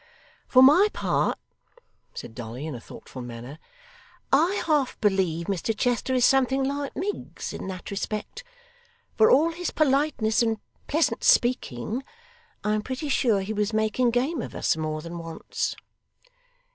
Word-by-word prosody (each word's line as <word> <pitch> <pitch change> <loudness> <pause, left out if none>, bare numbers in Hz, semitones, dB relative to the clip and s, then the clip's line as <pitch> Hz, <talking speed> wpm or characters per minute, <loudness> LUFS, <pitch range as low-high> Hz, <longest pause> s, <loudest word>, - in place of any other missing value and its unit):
'For 255 -1 +6
my 315 +10 +7
part,' - - 0 0.8
said 115 - -8
Dolly, 120 +4 -7
in 160 - -4
a 120 - -6
thoughtful 130 - -10
manner, 120 +5 -8 0.7
'I 335 +9 +3
half 295 -5 +1
believe 185 -5 +1
Mr 200 +3 -2
Chester 245 +2 0
is 250 -1 +4
something 270 0 +3
like 280 +1 -3
Miggs 395 +7 -4
in - - -6
that 185 0 -7
respect. 215 - -4 0.7
For 220 - +5
all 310 +5 +5
his 350 +1 -3
politeness 275 -7 +2
and 225 -1 +1 0.3
pleasant 315 +2 +1
speaking, 240 - +2 0.6
I 210 - +1
am 215 - 0
pretty 260 +6 -4
sure 225 -7 +2
he 200 +3 -3
was 210 +1 -1
making 220 +3 +2
game 255 +5 0
of - - -7
us, - - +1
more 155 -1 -3
than 170 0 -6
once. 165 -1 -4
225 Hz, 145 wpm, -26 LUFS, 180-275 Hz, 0.8 s, my